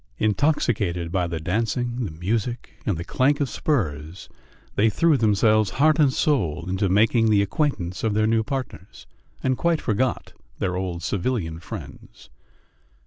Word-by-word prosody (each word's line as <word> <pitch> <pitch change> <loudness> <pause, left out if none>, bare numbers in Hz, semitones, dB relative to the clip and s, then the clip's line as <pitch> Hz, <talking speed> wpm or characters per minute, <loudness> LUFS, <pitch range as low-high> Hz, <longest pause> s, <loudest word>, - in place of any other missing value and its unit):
Intoxicated 105 - 0
by 90 -2 0
the 85 -1 -4
dancing, 115 +7 -1
the - - -4
music, 105 +9 -3 0.2
and 100 -6 +1
the 85 - -4
clank 135 +9 +1
of 140 - +1
spurs, 85 - -2 0.4
they 110 +2 +3
threw 165 +8 +3
themselves 110 -2 +3
heart 155 +2 +4
and 145 -3 +5
soul 90 - 0
into 95 +1 0
making 110 +3 +3
the 100 -2 +4
acquaintance 95 - -2
of 110 -2 0
their 110 0 +3
new 115 0 +2
partners, 110 - -6 0.4
and 130 -1 0
quite 170 -2 +2
forgot 120 +2 -1 0.2
their 90 -2 -1
old 90 -2 -3
civilian 95 -6 -2
friends. 85 - -10
110 Hz, 145 wpm, -24 LUFS, 90-125 Hz, 0.4 s, and